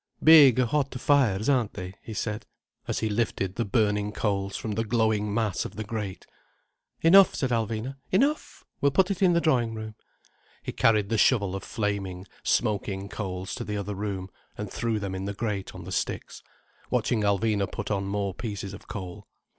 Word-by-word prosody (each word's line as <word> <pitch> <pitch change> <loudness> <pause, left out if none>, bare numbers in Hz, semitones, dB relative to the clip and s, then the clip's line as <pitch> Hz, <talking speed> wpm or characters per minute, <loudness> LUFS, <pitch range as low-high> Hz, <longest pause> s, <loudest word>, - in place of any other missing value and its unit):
"Big, 150 -6 +9
hot 130 +1 0
fires, 120 -8 +2
aren't 125 -6 +2
they?" 90 -1 -6
he - - -9
said, 110 0 -3 0.4
as - - -2
he 110 - +1
lifted 105 -3 -1
the 115 - -1
burning 105 -1 +1
coals 100 -2 -1
from 110 - -4
the 110 +2 0
glowing 110 -2 +1
mass 105 -3 0
of - - -8
the 110 - -4
grate. 105 -3 -5 0.8
"Enough," 190 +4 +7
said 130 -4 -1
Alvina. 115 +3 -2
"Enough! 280 +11 +1 0.2
We'll 140 - +4
put 190 +5 +3
it 195 - -3
in 180 -2 +5
the 170 - +4
drawing 120 -9 +1
room." 110 0 -6 0.7
He - - -4
carried 105 -3 +3
the 115 - +1
shovel 100 -7 +3
of 95 - -4
flaming, 100 -3 -3 0.2
smoking 100 -1 0
coals 95 -3 -5
to - - -4
the 105 0 -3
other 100 0 -3
room, 100 -1 -4 0.3
and 105 -2 -5
threw 115 -2 -1
them 100 -2 -4
in 95 0 -4
the 100 +1 -4
grate 105 -3 -3
on - - -8
the - - -8
sticks, - - -3 0.5
watching 115 -3 +1
Alvina 100 0 +1
put - - -4
on 100 -1 0
more 100 -1 -2
pieces 100 -2 -5
of - - -11
coal. 90 -3 -7
105 Hz, 185 wpm, -27 LUFS, 100-120 Hz, 0.8 s, Big